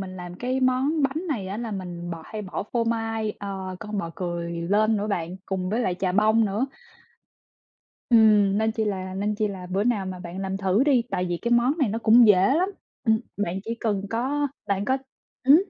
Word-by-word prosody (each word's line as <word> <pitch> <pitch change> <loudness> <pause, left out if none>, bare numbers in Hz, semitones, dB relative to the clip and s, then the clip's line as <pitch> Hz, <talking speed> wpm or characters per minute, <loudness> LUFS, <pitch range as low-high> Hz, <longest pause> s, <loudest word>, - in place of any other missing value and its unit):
mình 185 -1 -6
làm 180 0 -7
cái 255 +6 -2
món 265 +4 +2
bánh 300 +7 -1
này 215 -10 -2
á, 200 - -4
là 230 -1 -4
mình 175 -3 -5
bò 165 -1 -6
hay 215 -1 -6
bỏ 185 - -4
phô 235 -1 +1
mai, 225 -1 -1
ờ, 190 -2 -5
con 210 +1 -4
bò 170 -4 -3
cười 175 -2 -3
lên 215 +4 +2
nữa 205 +1 -1
bạn, 180 -3 -2
cùng 185 -1 -2
với 230 +3 0
lại 185 -6 0
chà 185 0 -1
bông 215 +3 +4
nữa 210 +6 0 1.4
ừm, 210 -3 +5
nên 220 0 +1
chi 220 -1 -1
là 185 -2 -3
nên 205 +2 -1
chi 210 0 0
là 185 -2 -7
bữa 195 +3 +1
nào 215 -5 +1
mà 185 -1 -5
bạn 180 +1 -8
làm 190 0 -2
thử 195 +3 +2
đi 270 -5 +4
tại 180 - 0
vì 175 -1 -2
cái 235 - -1
món 240 +3 +4
này 270 -7 +2
nó 220 - -2
cũng 230 +1 +6
dễ 200 +3 +5
lắm 360 +5 +2 0.4
ừm, 220 -1 +3 0.2
bạn 195 -2 -2
chỉ 230 +1 -3
cần 205 -4 0
có 275 +5 0 0.2
bạn 200 -1 0
có 260 +4 +1 0.5
ừm. 280 +4 +8
210 Hz, 220 wpm, -25 LUFS, 185-230 Hz, 1.4 s, ừm